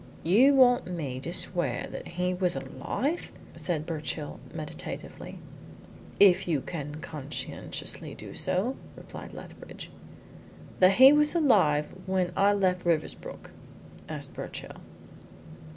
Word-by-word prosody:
"You 245 - +5
want 250 -3 +5
me 150 -8 -4
to 165 - -5
swear 175 0 -1
that - - -7
he 180 0 +1
was 180 -1 0
alive?" 305 +6 -3 0.2
said 160 -4 -2
Birchill, 155 -2 -4
meditatively. - - -7 0.8
"If 195 -3 +6
you 160 -5 +1
can 150 -2 -6
conscientiously 150 -2 -3
do - - -9
so," 230 +9 0 0.2
replied - - -10
Lethbridge. - - -10 0.9
"That 185 +1 +7
he 260 +6 +9
was 300 +2 +4
alive 185 - +3
when 185 -2 +1
I 200 +1 +4
left 185 -3 +1
Riversbrook?" 170 -3 -2 0.6
asked - - -6
Birchill. - - -7
180 Hz, 115 wpm, -28 LUFS, 155-215 Hz, 0.9 s, he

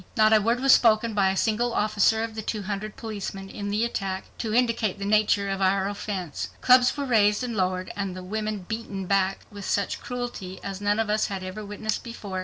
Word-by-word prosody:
Not 215 0 +5
a 215 - +6
word 230 +4 +1
was 270 0 +6
spoken 225 -1 +4
by 195 -2 +3
a 190 - -1
single 230 +3 +1
officer 215 +1 +2
of 225 -1 -4
the 220 - -4
two 215 -1 -3
hundred 210 +2 -4
policemen 200 -3 -6
in 205 0 -5
the 210 +3 +1
attack 195 -5 -4
to 225 - -2
indicate 230 -4 +1
the 200 - -5
nature 205 -1 +3
of 195 0 -2
our 190 0 +2
offense. 200 -5 -4
Clubs 255 +2 +5
were 285 - -2
raised 210 -2 +3
and 240 -2 -3
lowered 185 -1 -1
and 195 -2 -3
the 185 - -7
women 210 0 -3
beaten 220 -4 -4
back 195 0 +1
with 205 -1 -8
such 200 0 -1
cruelty 240 -7 -5
as 195 0 -5
none 205 +1 +1
of 220 -2 0
us 215 0 +2
had 195 -2 -5
ever 185 +3 -6
witnessed 210 +1 -3
before. 210 -6 -6
210 Hz, 215 wpm, -26 LUFS, 195-220 Hz, -, a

